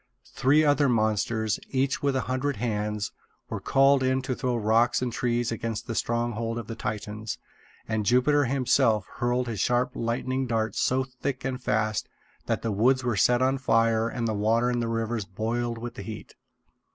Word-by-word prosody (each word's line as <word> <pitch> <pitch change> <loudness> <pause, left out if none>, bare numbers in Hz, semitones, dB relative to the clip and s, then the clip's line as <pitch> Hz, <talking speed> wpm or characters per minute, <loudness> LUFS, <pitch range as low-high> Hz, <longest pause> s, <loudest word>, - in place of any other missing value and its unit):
Three 150 +4 +4
other 145 -1 +3
monsters, 110 -1 +1
each 135 0 0
with 140 -1 +1
a 130 - +1
hundred 130 +3 -1
hands, 105 -2 -2 0.4
were - - -2
called 135 0 +4
in 130 0 +1
to 130 -1 -2
throw 125 -1 -1
rocks 115 +2 +3
and 125 -2 -2
trees 120 -1 0
against 115 0 -3
the 115 - -4
stronghold 115 0 -1
of 115 - -4
the 115 - -6
Titans; 105 0 -4 0.5
and 110 -1 -1
Jupiter 125 +6 +3
himself 125 -5 +2
hurled 120 +1 0
his 110 -4 -4
sharp 125 +1 +1
lightning 130 +2 -2
darts 110 -2 -1
so 130 +1 +2
thick 130 +1 -5
and 130 -1 -3
fast 110 -2 0 0.4
that - - -1
the 115 - -1
woods 130 +6 +3
were 120 -3 0
set 120 +5 +3
on 135 +1 +1
fire 115 -2 +2
and 115 -1 -2
the 110 - 0
water 115 +4 +2
in 120 - 0
the 115 - -1
rivers 115 -1 -2
boiled 115 +4 -2
with 120 +1 -6
the - - -8
heat. 110 +2 -8
120 Hz, 180 wpm, -27 LUFS, 110-130 Hz, 0.5 s, Three